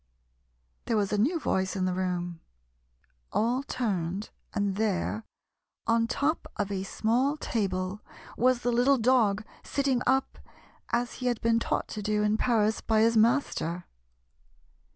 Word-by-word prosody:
There 225 Hz, -, +1 dB
was 205 Hz, -1 st, 0 dB
a -, -, +2 dB
new 315 Hz, -, +2 dB
voice 190 Hz, -9 st, 0 dB
in 185 Hz, -1 st, 0 dB
the 185 Hz, -, 0 dB
room. 175 Hz, -2 st, -2 dB, 0.9 s
All 240 Hz, +4 st, +1 dB
turned, 200 Hz, -7 st, -2 dB, 0.2 s
and 205 Hz, -3 st, -1 dB
there, 215 Hz, +1 st, -1 dB, 0.6 s
on 230 Hz, 0 st, +2 dB
top 285 Hz, +7 st, -1 dB
of 205 Hz, -1 st, -2 dB
a 195 Hz, -1 st, -2 dB
small 240 Hz, +9 st, 0 dB
table, 195 Hz, -5 st, -2 dB, 0.3 s
was 250 Hz, 0 st, +3 dB
the 245 Hz, -, +1 dB
little 250 Hz, +4 st, +4 dB
dog, 220 Hz, -4 st, +3 dB, 0.2 s
sitting 270 Hz, -3 st, 0 dB
up, 265 Hz, +1 st, +1 dB, 0.5 s
as 240 Hz, +1 st, 0 dB
he 250 Hz, -, 0 dB
had 240 Hz, -2 st, 0 dB
been 230 Hz, 0 st, +3 dB
taught -, -, -1 dB
to 215 Hz, -, -5 dB
do 210 Hz, 0 st, 0 dB
in 210 Hz, 0 st, +2 dB
Paris 220 Hz, -2 st, +2 dB
by 220 Hz, -1 st, +2 dB
his 230 Hz, +1 st, +4 dB
master. 220 Hz, -, +1 dB
220 Hz, 145 wpm, -28 LUFS, 195-245 Hz, 0.9 s, little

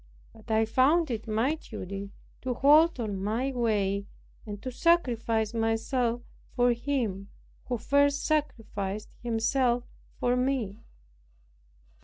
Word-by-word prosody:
But 220 Hz, +1 st, -17 dB
I 220 Hz, 0 st, +3 dB
found 275 Hz, +7 st, +3 dB
it 225 Hz, -1 st, -4 dB
my 225 Hz, +7 st, +1 dB
duty 200 Hz, -, -7 dB, 0.3 s
to 255 Hz, -1 st, -2 dB
hold 300 Hz, +3 st, +5 dB
on 205 Hz, -4 st, -3 dB
my 235 Hz, +6 st, 0 dB
way, 205 Hz, -5 st, 0 dB, 0.4 s
and 205 Hz, -1 st, -6 dB
to 255 Hz, -, -4 dB
sacrifice 235 Hz, -8 st, +1 dB
myself 230 Hz, +2 st, 0 dB, 0.3 s
for 245 Hz, -1 st, +4 dB
Him 230 Hz, -6 st, -2 dB, 0.4 s
who 245 Hz, -, -2 dB
first 285 Hz, +4 st, +2 dB
sacrificed 215 Hz, -9 st, -2 dB
Himself 240 Hz, +1 st, +1 dB, 0.4 s
for 245 Hz, 0 st, +2 dB
me. 250 Hz, -5 st, -1 dB
235 Hz, 115 wpm, -28 LUFS, 215-265 Hz, 0.4 s, hold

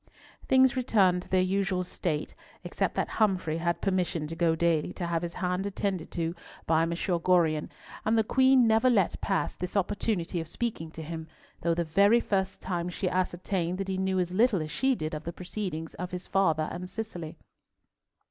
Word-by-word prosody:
Things 260 Hz, -1 st, +5 dB
returned 195 Hz, -8 st, +3 dB
to -, -, -15 dB
their 185 Hz, -1 st, +3 dB
usual 185 Hz, -1 st, 0 dB
state 160 Hz, -4 st, -3 dB, 0.3 s
except -, -, -2 dB
that -, -, 0 dB
Humfrey 185 Hz, -7 st, +1 dB
had 170 Hz, 0 st, -1 dB
permission 180 Hz, -5 st, 0 dB
to 160 Hz, +2 st, -6 dB
go 165 Hz, -1 st, +2 dB
daily 165 Hz, -2 st, +1 dB
to 175 Hz, -, -4 dB
have 170 Hz, -1 st, 0 dB
his 170 Hz, -1 st, -5 dB
hand 180 Hz, +2 st, -1 dB
attended 195 Hz, -4 st, -2 dB
to 165 Hz, -1 st, -1 dB, 0.3 s
by 160 Hz, 0 st, +3 dB
M. 165 Hz, -, +1 dB
Gorion, 170 Hz, -2 st, +1 dB, 0.3 s
and 225 Hz, +1 st, +2 dB
the 220 Hz, -, +4 dB
Queen 260 Hz, +2 st, +5 dB
never 225 Hz, +3 st, +4 dB
let 200 Hz, -7 st, +2 dB
pass 195 Hz, -, 0 dB
this 180 Hz, +3 st, -4 dB
opportunity 185 Hz, -3 st, -1 dB
of 165 Hz, -, -7 dB
speaking 175 Hz, -4 st, -3 dB
to 160 Hz, 0 st, -8 dB
him, 160 Hz, 0 st, -6 dB, 0.3 s
though 170 Hz, 0 st, +1 dB
the 170 Hz, -, 0 dB
very 200 Hz, +8 st, +5 dB
first 190 Hz, -4 st, -1 dB
time 175 Hz, -2 st, -2 dB
she 180 Hz, +1 st, -2 dB
ascertained 180 Hz, -1 st, -1 dB
that 195 Hz, 0 st, -3 dB
he 190 Hz, 0 st, -1 dB
knew 190 Hz, 0 st, 0 dB
as 180 Hz, -1 st, 0 dB
little 210 Hz, -4 st, +3 dB
as 155 Hz, -, -7 dB
she 265 Hz, 0 st, +2 dB
did 155 Hz, -5 st, -4 dB
of 155 Hz, 0 st, -4 dB
the 170 Hz, -, -4 dB
proceedings 180 Hz, -3 st, -5 dB
of 180 Hz, 0 st, -5 dB
his 180 Hz, 0 st, -6 dB
father 160 Hz, -5 st, +2 dB
and 180 Hz, +1 st, -6 dB
Cicely. 180 Hz, -8 st, -6 dB
180 Hz, 190 wpm, -28 LUFS, 165-195 Hz, 0.3 s, Things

